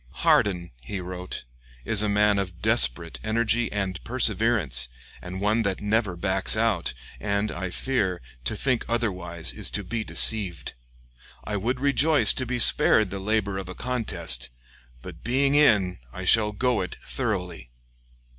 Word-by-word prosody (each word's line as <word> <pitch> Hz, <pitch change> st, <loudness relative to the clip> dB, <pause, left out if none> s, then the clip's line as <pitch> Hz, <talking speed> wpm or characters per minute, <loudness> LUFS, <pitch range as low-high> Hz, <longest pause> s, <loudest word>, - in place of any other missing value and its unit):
"Hardin," 90 Hz, -4 st, +3 dB
he 80 Hz, +11 st, -5 dB
wrote, 90 Hz, 0 st, -6 dB, 0.4 s
"is 105 Hz, -, +3 dB
a 105 Hz, -, 0 dB
man 105 Hz, 0 st, +3 dB
of 90 Hz, -3 st, -5 dB
desperate 65 Hz, +8 st, +2 dB
energy 115 Hz, +1 st, 0 dB
and 95 Hz, -3 st, -3 dB
perseverance, 110 Hz, -, +2 dB, 0.3 s
and 90 Hz, +1 st, -7 dB
one 105 Hz, +3 st, +2 dB
that 100 Hz, -3 st, -1 dB
never 105 Hz, -2 st, 0 dB
backs 95 Hz, +3 st, 0 dB
out; 110 Hz, -, 0 dB, 0.2 s
and, 100 Hz, 0 st, -1 dB
I 90 Hz, +1 st, -4 dB
fear, 95 Hz, -4 st, -1 dB, 0.3 s
to -, -, -1 dB
think 130 Hz, -3 st, 0 dB
otherwise 90 Hz, -, -2 dB
is -, -, -1 dB
to 105 Hz, -, -3 dB
be 110 Hz, +4 st, -3 dB
deceived.... 100 Hz, -7 st, 0 dB, 0.7 s
I 105 Hz, -, -4 dB
would 120 Hz, +6 st, -1 dB
rejoice 145 Hz, +3 st, +4 dB
to 130 Hz, -2 st, -2 dB
be 125 Hz, +1 st, -1 dB
spared 110 Hz, -3 st, +4 dB
the 100 Hz, -, -4 dB
labor 100 Hz, -1 st, 0 dB
of 95 Hz, -2 st, -7 dB
a 90 Hz, -, -7 dB
contest, 85 Hz, -, -2 dB, 0.5 s
'but -, -, -10 dB
being 135 Hz, +4 st, +1 dB
in' 105 Hz, -12 st, +4 dB
I 95 Hz, +8 st, -7 dB
shall 105 Hz, +2 st, +4 dB
go 120 Hz, 0 st, 0 dB
it 90 Hz, -, -5 dB
thoroughly...." 90 Hz, -, -3 dB
100 Hz, 150 wpm, -25 LUFS, 90-115 Hz, 0.7 s, rejoice